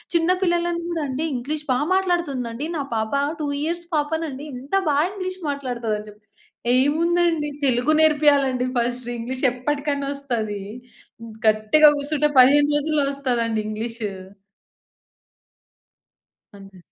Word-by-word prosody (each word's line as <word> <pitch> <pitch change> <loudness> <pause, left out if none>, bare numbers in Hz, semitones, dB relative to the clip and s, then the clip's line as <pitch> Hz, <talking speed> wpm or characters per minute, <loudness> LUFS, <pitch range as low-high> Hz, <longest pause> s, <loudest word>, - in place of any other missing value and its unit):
చిన్న 335 +1 +3
పిల్లలని 345 -1 0
గూడండి 305 -4 -3
ఇంగ్లీష్ 295 +5 -4
బా 250 - +1 0.2
మాట్లాడుతుందండి 300 -8 -1
నా 285 - -2
పాప. 220 +3 -2 0.3
2 300 - -1 0.2
ఇయర్స్ 340 +2 -2
పాప 295 0 0 0.2
నండి. 285 -1 -7
ఇంత 275 +6 -13 0.2
బా 280 - +2
ఇంగ్లీష్ 370 -1 -5
మాట్లాడుతది 245 -6 -3
అని 210 - -10
జెప్పి, 210 +1 -18 0.5
ఏముందండి 325 +2 +2 0.2
తెలుగు 250 +2 +2
నేర్పియాలండి 285 -5 +4
ఫస్ట్ 240 +1 -2
ఇంగ్లీష్ 255 +3 -5
ఎప్పటికైనా 280 +2 -2
ఒస్తది. 225 -7 -3 0.9
గట్టిగా 215 +8 +5
కూసుంటే, 295 +1 0
15 290 +3 +6
రోజుల్లో 295 -1 0
ఒస్తదండి 235 -5 -1
ఇంగ్లీషు. 220 0 -4 2.4
అంతే. 195 -1 -14
280 Hz, 115 wpm, -22 LUFS, 240-310 Hz, 2.4 s, 15